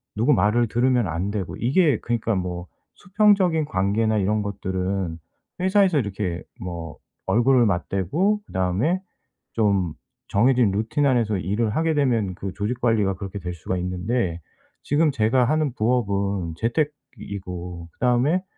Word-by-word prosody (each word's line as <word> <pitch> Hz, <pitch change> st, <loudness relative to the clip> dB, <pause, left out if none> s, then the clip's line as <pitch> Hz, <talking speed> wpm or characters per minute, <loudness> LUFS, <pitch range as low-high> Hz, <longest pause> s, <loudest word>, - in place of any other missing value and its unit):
누구 120 Hz, +8 st, +3 dB
말을 115 Hz, +2 st, +3 dB
들으면 120 Hz, -1 st, +2 dB
안 85 Hz, +4 st, -2 dB
되고 100 Hz, -4 st, -4 dB
이게 140 Hz, -, +2 dB
그니까 115 Hz, -1 st, -1 dB
뭐 90 Hz, -1 st, -3 dB, 0.3 s
수평적인 185 Hz, -5 st, +3 dB
관계나 105 Hz, +2 st, +1 dB
이런 105 Hz, +2 st, +1 dB
것들은 95 Hz, -3 st, -3 dB, 0.4 s
회사에서 190 Hz, -2 st, +3 dB
이렇게 95 Hz, -5 st, -3 dB, 0.2 s
뭐 85 Hz, -3 st, -6 dB, 0.3 s
얼굴을 120 Hz, +1 st, +4 dB
맞대고 100 Hz, -, 0 dB
그다음에 95 Hz, -, 0 dB, 0.5 s
좀 100 Hz, -7 st, +1 dB, 0.3 s
정해진 120 Hz, 0 st, +3 dB
루틴 110 Hz, +9 st, 0 dB
안에서 115 Hz, -6 st, +2 dB
일을 105 Hz, +5 st, -1 dB
하게 160 Hz, 0 st, +1 dB
되면 120 Hz, -10 st, +1 dB
그 95 Hz, +1 st, -5 dB
조직 110 Hz, +4 st, -3 dB
관리가 110 Hz, -5 st, +2 dB
그렇게 95 Hz, +1 st, -7 dB
될 90 Hz, -1 st, -5 dB
수가 85 Hz, +2 st, -4 dB
있는데 90 Hz, +1 st, -2 dB, 0.4 s
지금 150 Hz, +2 st, +2 dB
제가 125 Hz, 0 st, +2 dB
하는 155 Hz, +1 st, +1 dB
부업은 100 Hz, -7 st, 0 dB
재택이고 100 Hz, -, -4 dB
그다음에 130 Hz, +9 st, +2 dB
110 Hz, 300 characters per minute, -23 LUFS, 95-130 Hz, 0.5 s, 얼굴을